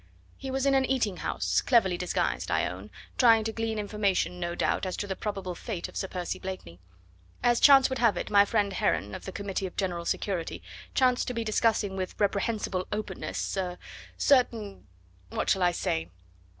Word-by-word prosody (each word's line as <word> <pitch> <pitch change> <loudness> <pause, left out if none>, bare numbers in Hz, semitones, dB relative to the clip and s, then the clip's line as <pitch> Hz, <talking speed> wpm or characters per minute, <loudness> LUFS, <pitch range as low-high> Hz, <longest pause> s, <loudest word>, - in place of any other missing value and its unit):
"He 270 - -7
was 265 +1 -1
in 275 - +4
an 270 -1 +4
eating 235 -8 0
house, - - 0
cleverly 225 -8 +3
disguised, 180 0 -1
I - - +2
own, 95 +4 -6 0.3
trying 225 -3 +6
to 225 - -2
glean 225 -1 -2
information, 200 -4 0
no 175 0 -3
doubt - - 0
as 185 - -4
to - - -2
the 195 -1 -3
probable 195 -3 -4
fate 180 +1 -5
of - - -15
Sir 190 - -2
Percy 180 -2 -4
Blakeney. 185 - -7 0.6
As 240 -1 +4
chance 275 -2 +7
would 260 -1 -3
have 230 -3 +3
it, - - -4
my 200 -1 +7
friend 205 -1 0
Heron, 100 - 0
of - - -7
the 190 - -5
Committee 195 -1 -3
of 180 - -13
General 175 -3 -2
Security, 180 -3 -2 0.3
chanced 255 -2 +3
to 250 - -3
be 230 - -1
discussing 215 -2 +1
with 185 -1 -5
reprehensible 200 -2 0
openness 205 -2 -3
er 180 -2 -2 0.4
certain 230 - +1 0.4
what - - -1
shall 190 - +2
I 175 -1 +4
say? 80 - -2
200 Hz, 190 wpm, -28 LUFS, 185-230 Hz, 0.6 s, chance